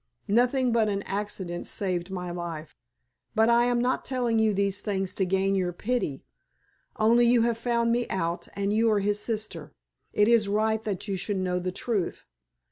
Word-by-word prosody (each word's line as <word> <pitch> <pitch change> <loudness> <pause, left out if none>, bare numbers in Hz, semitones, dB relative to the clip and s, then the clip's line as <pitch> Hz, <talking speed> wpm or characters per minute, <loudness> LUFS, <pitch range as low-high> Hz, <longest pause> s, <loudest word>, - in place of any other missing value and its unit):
Nothing 250 +2 +3
but 225 -2 +2
an 200 0 -2
accident 195 -3 -4
saved 180 -2 -2
my 180 -2 -4
life. 170 -3 -6 0.6
But 220 +1 +4
I 235 0 +5
am 245 0 +1
not 250 +2 0
telling 245 -4 0
you 220 -1 +3
these 200 0 0
things 195 -3 -2
to 190 - 0
gain 190 +1 +1
your 185 -2 0
pity. 205 - -2 0.7
Only 235 +2 +4
you 235 -1 +4
have 230 -1 0
found 235 0 +1
me 240 +1 +1
out, 170 -2 -2
and 200 0 -1
you 225 +1 +3
are 210 -2 +3
his 205 +1 0
sister. 210 -9 -4 0.4
It 210 - +3
is 230 -3 +4
right 220 +1 +1
that 205 0 -3
you 195 - -1
should 195 +2 -2
know 180 -1 0
the 180 +1 -3
truth. 200 -1 -2
205 Hz, 185 wpm, -27 LUFS, 185-230 Hz, 0.7 s, I